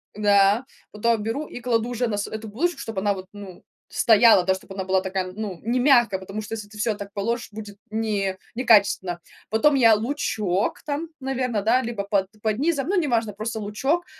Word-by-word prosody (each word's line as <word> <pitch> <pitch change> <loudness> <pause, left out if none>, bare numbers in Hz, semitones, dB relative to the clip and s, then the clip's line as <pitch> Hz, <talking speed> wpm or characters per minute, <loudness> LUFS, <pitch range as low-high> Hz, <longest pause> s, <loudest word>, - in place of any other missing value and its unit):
да. 205 +2 +4 0.3
Потом 220 +1 +1
беру 235 +8 -3
и 245 - -8
кладу 235 -1 0
уже 245 0 -1
на 210 - -2
с 205 - -2
эту 220 0 -6
булочку, 300 +11 -1
чтобы 220 -7 -4
она 205 0 +2
вот, 190 -1 -8
ну, 200 -3 -11 0.3
стояла, 225 -4 +5
да, 190 - +3
чтобы 190 0 -11
она 190 -1 -3
была 190 0 +2
такая, 185 -1 -3
ну, 200 -4 -5
не 235 +3 0
мягкая, 240 -8 +4
потому 195 +3 -6
что 220 +1 -7
если 205 -2 -8
ты 215 - -13
всё 215 0 0
так 200 -1 -8
положишь, 225 +4 -2
будет 210 -1 -9
не 205 -3 -1 0.2
некачественно. 200 -7 +3 0.3
Потом 275 +7 +3
я 230 -4 +6
лучок 215 -6 -1
там, 305 +2 -3
наверное, 255 -5 -1
да, 235 +5 +3
либо 230 -4 -4
под 200 -1 +1
под 215 -1 0
низом, 290 -1 0
ну, 390 +1 +1
неважно, 235 -9 +1
просто 220 +2 -4
лучок, 270 +12 -1
220 Hz, 200 wpm, -24 LUFS, 200-240 Hz, 0.3 s, я